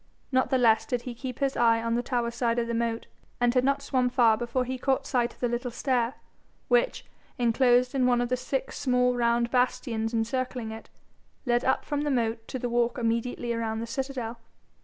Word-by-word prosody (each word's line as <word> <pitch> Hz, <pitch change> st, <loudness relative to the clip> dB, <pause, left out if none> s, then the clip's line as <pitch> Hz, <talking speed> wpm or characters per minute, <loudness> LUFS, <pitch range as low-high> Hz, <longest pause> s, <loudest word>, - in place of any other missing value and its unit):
Not 260 Hz, 0 st, +2 dB
the 265 Hz, -, +3 dB
less 225 Hz, -3 st, +3 dB
did 245 Hz, -1 st, -2 dB
he 250 Hz, -, -5 dB
keep 250 Hz, +1 st, -6 dB
his 275 Hz, -1 st, 0 dB
eye 230 Hz, -1 st, +4 dB
on 230 Hz, 0 st, -1 dB
the 240 Hz, -, +1 dB
tower 240 Hz, -1 st, -1 dB
side 235 Hz, 0 st, 0 dB
of 235 Hz, -, +1 dB
the 235 Hz, -, -3 dB
moat, 230 Hz, 0 st, -1 dB, 0.3 s
and 240 Hz, 0 st, +3 dB
had 250 Hz, -1 st, +3 dB
not 275 Hz, +1 st, +1 dB
swum 255 Hz, -2 st, +1 dB
far 240 Hz, -3 st, +4 dB
before 240 Hz, +3 st, -2 dB
he 260 Hz, +1 st, -4 dB
caught 270 Hz, +1 st, 0 dB
sight 245 Hz, -3 st, 0 dB
of -, -, -21 dB
the 245 Hz, -, +2 dB
little 240 Hz, +1 st, -2 dB
stair, 245 Hz, 0 st, 0 dB, 0.5 s
which, -, -, +2 dB, 0.3 s
enclosed 245 Hz, +1 st, +3 dB
in 260 Hz, -2 st, +2 dB
one 245 Hz, -1 st, +3 dB
of 245 Hz, 0 st, -1 dB
the 255 Hz, -, +2 dB
six 260 Hz, +1 st, -3 dB
small 250 Hz, -2 st, +2 dB
round 235 Hz, 0 st, +1 dB
bastions 245 Hz, -3 st, 0 dB
encircling 235 Hz, 0 st, -2 dB
it, 220 Hz, 0 st, -9 dB, 0.6 s
led 240 Hz, -1 st, +2 dB
up 260 Hz, -, +1 dB
from 290 Hz, -1 st, -1 dB
the 295 Hz, -, -1 dB
moat 230 Hz, -3 st, -1 dB
to -, -, -4 dB
the 245 Hz, -, -3 dB
walk 240 Hz, 0 st, +1 dB
immediately 235 Hz, 0 st, -1 dB
around 225 Hz, -1 st, -2 dB
the 230 Hz, -, -3 dB
citadel. 245 Hz, -2 st, -4 dB
245 Hz, 210 wpm, -27 LUFS, 235-255 Hz, 0.6 s, eye